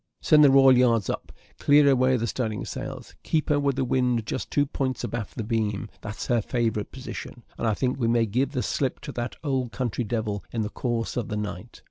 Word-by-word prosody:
Send 150 -1 +5
the 145 - +8
royal 135 -1 +7
yards 120 -4 +3
up - - -6 0.3
clear 145 0 +5
away 130 -1 +4
the 115 - -1
studding 110 -2 -2
sails 130 -1 -7
keep 155 -2 -1
her 145 -1 +3
with 140 -2 +1
the 135 -1 0
wind 125 -3 +1
just - - -4
two 145 - +2
points 135 -2 -3
abaft 115 -3 -4
the 115 - -2
beam, 105 -2 -1
that's 105 -1 -6
her 120 -2 +2
favourite 115 -2 -1
position; 130 -2 -8
and 115 - -2
I 110 - +2
think 130 +2 -1
we 115 - +1
may 115 0 +3
give 125 +7 -1
the 125 - -1
slip 135 -3 -1
to - - -6
that 120 0 -4
old 130 -5 -1
country 125 -1 -2
devil 105 -3 -2
in 115 -2 -1
the 105 - -3
course 120 0 -2
of 120 - -1
the 105 - -3
night." 105 -4 -6
125 Hz, 220 wpm, -26 LUFS, 115-135 Hz, 0.3 s, the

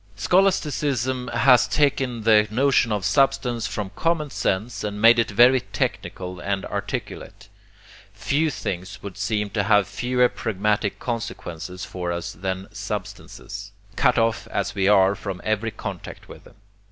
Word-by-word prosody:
Scholasticism 135 - +1
has 125 -1 +4
taken 135 -5 0
the 105 -1 +5
notion 125 0 +2
of 105 -2 -1
substance 120 +1 +1
from 100 -3 -4
common 165 -3 0
sense 105 +3 -2
and 105 -1 -4
made 115 +2 +6
it 115 - +1
very 120 +5 +5
technical 90 -5 -4
and 100 0 -2
articulate. 100 +2 -6 0.6
Few 140 +10 0
things 95 -9 -5
would 100 -2 -7
seem 105 0 -2
to 105 - 0
have 100 -1 +3
fewer 125 +5 +1
pragmatic 105 -2 -1
consequences 90 -7 -5
for 90 -1 -4
us 85 0 -4
than 95 0 -4
substances, 100 0 -7 0.2
cut 125 -2 +3
off 115 -1 +1
as - - -2
we 95 -1 +1
are 100 -1 +5
from 100 -3 -6
every 110 +1 0
contact 100 -4 -8
with - - -13
them. - - -17
105 Hz, 140 wpm, -23 LUFS, 100-125 Hz, 0.6 s, made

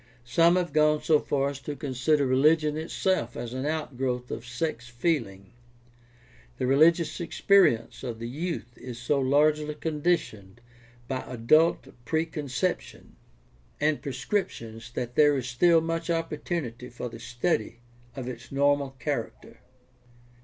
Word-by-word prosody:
Some 165 +8 +4
have 180 -1 -1
gone 150 0 +3
so 155 -2 +4
far 140 -1 0
as 140 -1 -7
to 145 +2 -6
consider 140 +2 +1
religion 150 +4 +3
itself 160 -4 -1
as 120 0 -5
an 130 +2 -3
outgrowth 130 -5 -2
of 115 - -6
sex 120 -1 -3
feeling. 120 - -2 1.0
The - - -1
religious 160 +5 +4
experience 170 - +3
of 120 -3 -5
the 115 +1 -5
youth 145 -2 -4
is 125 -2 -8
so 130 +4 0
largely 150 +3 +2
conditioned 150 - -2 0.5
by 130 -1 -2
adult 140 +7 +3
preconception 160 +2 -3 0.6
and 150 0 +1
prescriptions 115 - -3
that 125 -1 -4
there 145 +1 +5
is 130 -1 -3
still 165 +7 +4
much 165 +1 -3
opportunity 150 -6 -3
for 125 0 -6
the 115 -1 -9
study 120 +1 -1 0.4
of 130 -2 -5
its 125 -1 -8
normal 140 -1 +1
character. 120 - -5
140 Hz, 130 wpm, -27 LUFS, 120-160 Hz, 1.0 s, there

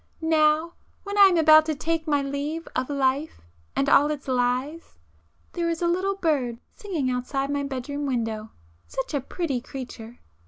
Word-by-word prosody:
—now 315 +1 +2 0.3
when 405 0 -5
I 405 -1 +9
am 360 -3 +2
about 310 -1 +7
to 310 - 0
take 325 +2 -2
my 290 -2 +2
leave 285 +4 -4
of 255 +1 -1
life 280 +2 0 0.4
and 275 - +1
all 290 +1 +5
its 295 -2 -4
lies!... 255 +5 -1 0.6
There 340 -1 -1
is 335 - -2
a - - +3
little 375 +3 0
bird 285 -10 0 0.2
singing 325 -11 -2
outside 270 +3 -2
my 285 0 0
bedroom 280 +1 -4
window,—such 220 - -5
a 285 - 0
pretty 275 -3 -3
creature! 245 -3 -9
285 Hz, 160 wpm, -25 LUFS, 255-320 Hz, 0.6 s, I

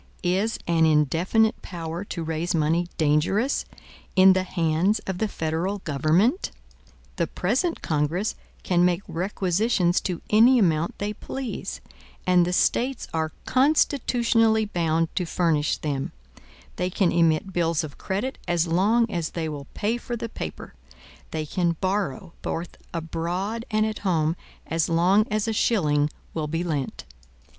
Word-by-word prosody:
Is 190 +5 +1
an 165 -1 +3
indefinite 165 +9 +2
power 170 0 -5
to 170 -4 -5
raise 160 +2 -1
money 165 +2 +1
dangerous 165 - +1 0.5
in 190 0 +8
the 185 - +1
hands 180 +2 +1
of 190 -2 -3
the 220 - +1
federal 165 +3 -2
government? 175 - +1 0.7
The 170 - +1
present 260 - -1
Congress 160 +7 0 0.3
can 175 -1 +2
make 180 +1 +2
requisitions 185 +1 +1
to 180 -4 -4
any 235 +5 +6
amount 170 -6 +1
they 205 +1 -2
please, 255 0 -5 0.4
and 180 -1 +4
the - - -1
States 250 +7 +1
are 160 -1 -1
constitutionally 240 -5 +3
bound 165 -4 0
to 180 - +1
furnish 160 -4 +1
them; 140 -3 -3 0.6
they 180 - 0
can 185 -1 +1
emit 165 +2 +2
bills 170 -1 +1
of 145 -2 -8
credit 205 +8 -3
as 175 -1 +2
long 205 +8 +3
as 170 -7 -2
they 165 -2 -3
will 145 -3 -6
pay 220 +3 0
for 240 0 -5
the 230 0 -5
paper; - - -7 0.6
they 155 -1 -3
can 170 +1 0
borrow, 190 -1 -2
both 170 +2 -3 0.2
abroad 175 +7 -3
and 215 -1 +2
at 220 -1 -3
home, 165 -4 +1 0.3
as 165 0 0
long 185 +6 +3
as 215 +1 0
a 225 - 0
shilling 150 -10 +2 0.2
will 155 -2 -2
be 165 +3 -2
lent. 150 -6 -3
175 Hz, 145 wpm, -25 LUFS, 165-210 Hz, 0.7 s, in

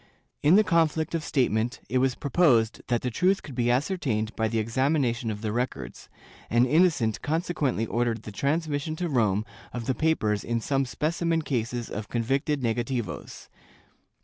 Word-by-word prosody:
In 155 +5 +5
the 215 - +6
conflict 160 -4 +1
of 165 -2 -1
statement, 120 -3 0
it 130 - +1
was 130 -1 +2
proposed 130 -7 +2
that 120 -2 0
the 125 - -1
truth 185 - +2
could 140 - -9
be 120 -1 0
ascertained 125 - 0
by 110 - +1
the 115 +1 -2
examination 120 +1 0
of 105 -1 -4
the 110 -2 -2
records, 110 - -4 0.4
and 120 +2 +4
Innocent 145 - +2
consequently 150 - -1
ordered 115 0 -1
the 105 - -7
transmission 150 +5 -1
to 175 +2 -2
Rome 110 - +1 0.3
of 120 -2 -5
the 130 - +1
papers 120 -10 +1
in 120 0 -1
some 135 +3 0
specimen 165 +5 -1
cases 120 -3 -2
of 105 0 -6
convicted 135 +5 0
negativos. 120 0 -3
125 Hz, 160 wpm, -27 LUFS, 115-155 Hz, 0.4 s, the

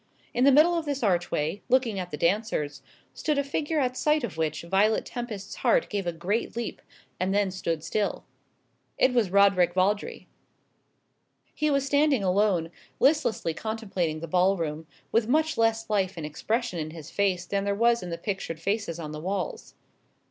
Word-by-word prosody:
In 245 +2 +3
the 280 - +7
middle 310 +6 +6
of 335 -2 -1
this 280 -3 -2
archway, 175 -2 0
looking 245 -6 +2
at 180 -1 -4
the 150 - -5
dancers, 170 -4 0 0.3
stood 300 -2 -1
a 280 - +2
figure 295 +3 -1
at 255 -2 0
sight 300 +1 +2
of 240 - -4
which 160 -1 -2
Violet 195 +5 +2
Tempest's 220 -5 -6
heart - - +2
gave 200 -3 -2
a - - +1
great 185 +9 -2
leap, 235 -1 -4 0.4
and 190 +2 0
then 205 -2 +2
stood 165 -4 -3
still. 200 +5 -1 0.7
It 255 - +3
was 235 -6 +2
Roderick 195 -2 +4
Vawdrey. 200 +3 0 1.3
He 305 0 0
was 275 -1 +1
standing 285 -4 +3
alone, 185 -3 +2 0.3
listlessly 270 - +2
contemplating 195 -7 -3
the 165 - -5
ball 185 +4 +3
room, 160 -1 -4 0.2
with 225 -1 +2
much 310 +4 +2
less 225 0 +1
life 195 -3 0
and 160 - -4
expression 215 - -2
in 155 0 -3
his 160 -1 -10
face 190 -3 0
than 195 +2 -1
there 200 0 0
was 235 +2 +3
in 180 - -6
the 170 - -4
pictured 170 -3 -4
faces 200 -1 -2
on 155 -3 -6
the 155 0 -6
walls. 185 0 -4
200 Hz, 175 wpm, -27 LUFS, 175-235 Hz, 1.3 s, the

